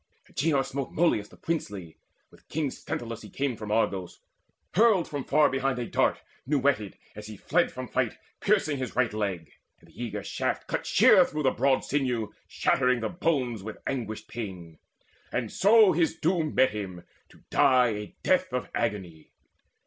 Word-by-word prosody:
Agenor 140 -2 +1
smote 135 0 -4
Molus 155 -11 +1
the - - -17
princely, 100 - -4 0.3
with - - -22
king 150 -3 -1
Sthenelus 115 -2 -5
He - - -11
came 140 -3 -2
from 105 -1 -7
Argos, 95 -5 -1 0.5
hurled 210 -3 +4
from 145 -2 -4
far 150 +2 +4
behind 135 -1 -1
A 120 - -2
dart - - +1 0.2
new 145 +1 +2
whetted, 130 -7 0 0.2
as 105 0 -8
he 110 -1 -9
fled 170 - +1
from 130 0 -6
fight, 125 -3 -1 0.2
Piercing 195 -8 +1
his 130 -4 -5
right 125 -3 +1
leg, 100 -6 -3 0.3
and - - -21
the 120 - -8
eager 105 -3 -4
shaft - - -2
Cut - - -3
sheer - - +6
through 150 +1 -3
the 130 - +4
broad 135 +1 +2
sinew, 125 -6 -1
shattering 125 -2 +1
The - - -1
bones 140 - -1
with 110 +2 -7
anguished 115 -5 -4
pain: 90 -8 -7 0.5
and 115 -4 -2
so 210 +1 +6
his 165 -1 +1
doom 165 -2 0
Met 130 +1 +4
him, 95 -4 -6 0.3
to - - -21
die 125 -3 +5
a 105 -1 -5
death - - +2
of - - -3
agony. 90 -6 -3
125 Hz, 170 wpm, -27 LUFS, 105-145 Hz, 0.5 s, sheer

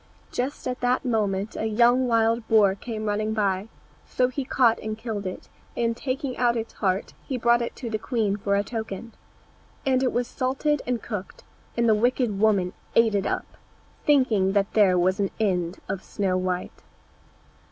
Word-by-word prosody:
Just 255 +3 -3
at 250 0 -3
that 250 +2 +1
moment 210 -4 0
a 220 - -1
young 240 +3 +4
wild 230 0 +2
boar 210 -3 +5
came 215 +2 -5
running 215 +1 -1
by, 200 -1 0 0.4
so 250 0 +1
he 270 +2 -3
caught 245 -3 +3
and 215 0 -4
killed 220 -4 -4
it, 185 - -7 0.3
and 230 -1 +1
taking 260 +1 -3
out 240 -1 +2
its 225 0 -4
heart, 190 -1 -1
he 260 - -4
brought 235 0 +3
it 235 - -4
to 245 - -6
the 220 -1 -2
queen 220 -4 0
for 200 -1 0
a 200 - +2
token. 220 0 -6 0.7
And 260 -1 +3
it 255 - +2
was 245 0 -1
salted 270 +3 0
and 245 -2 -1
cooked, 205 -4 -6 0.3
and 235 0 +3
the 220 - +6
wicked 235 -1 +1
woman 200 -4 +2 0.2
ate 230 -2 +5
it 200 -1 0
up, - - -1 0.6
thinking 230 -10 +3
that 200 0 +1
there 195 -4 +5
was 185 +3 +2
an 200 -1 +1
end 180 -4 0
of 190 - -4
Snow 190 -2 -1
white. 185 -1 -2
220 Hz, 180 wpm, -25 LUFS, 200-245 Hz, 0.7 s, the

